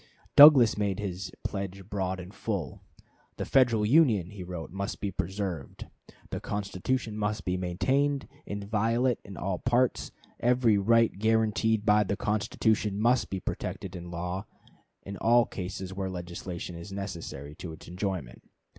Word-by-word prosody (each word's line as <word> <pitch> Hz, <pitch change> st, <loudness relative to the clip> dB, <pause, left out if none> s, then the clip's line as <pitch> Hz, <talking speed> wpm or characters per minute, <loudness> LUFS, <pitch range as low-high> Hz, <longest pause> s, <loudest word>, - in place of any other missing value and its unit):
Douglas 135 Hz, -8 st, +9 dB
made 100 Hz, -2 st, 0 dB
his 95 Hz, -1 st, -4 dB
pledge 95 Hz, -1 st, -5 dB
broad 95 Hz, -2 st, -2 dB
and 90 Hz, +2 st, -9 dB
full. 100 Hz, -, -4 dB, 0.6 s
"The -, -, -3 dB
Federal 120 Hz, -5 st, +3 dB
Union," 110 Hz, -, +4 dB
wrote 90 Hz, -3 st, -6 dB
he, -, -, -12 dB
"must 100 Hz, 0 st, -3 dB
be 100 Hz, -, -2 dB
preserved. 95 Hz, -5 st, -4 dB, 0.5 s
The -, -, -2 dB
Constitution 105 Hz, +3 st, -2 dB
must 105 Hz, -1 st, -2 dB
be 90 Hz, -, 0 dB
maintained 130 Hz, +11 st, 0 dB, 0.2 s
inviolate 115 Hz, +4 st, 0 dB
in 100 Hz, -, -10 dB
all 95 Hz, 0 st, -2 dB
its 125 Hz, -, -3 dB
parts. 125 Hz, +1 st, +1 dB, 0.3 s
Every 120 Hz, -4 st, +3 dB
right 115 Hz, +3 st, +3 dB
guaranteed 110 Hz, 0 st, +2 dB
by 105 Hz, 0 st, +5 dB
the 100 Hz, 0 st, -2 dB
Constitution 105 Hz, -1 st, 0 dB
must 120 Hz, +3 st, +2 dB
be 95 Hz, -, -3 dB
protected 95 Hz, -, -4 dB
by 90 Hz, -, -7 dB
law 90 Hz, +2 st, -5 dB, 0.6 s
in 100 Hz, 0 st, -7 dB
all 120 Hz, +1 st, +4 dB
cases 95 Hz, 0 st, -6 dB
where 95 Hz, 0 st, -3 dB
legislation 90 Hz, 0 st, -6 dB
is 85 Hz, +4 st, -9 dB
necessary 85 Hz, -7 st, -6 dB
to 85 Hz, -, -7 dB
its 80 Hz, -, -12 dB
enjoyment. 90 Hz, -, -4 dB
100 Hz, 145 wpm, -28 LUFS, 90-110 Hz, 0.6 s, Douglas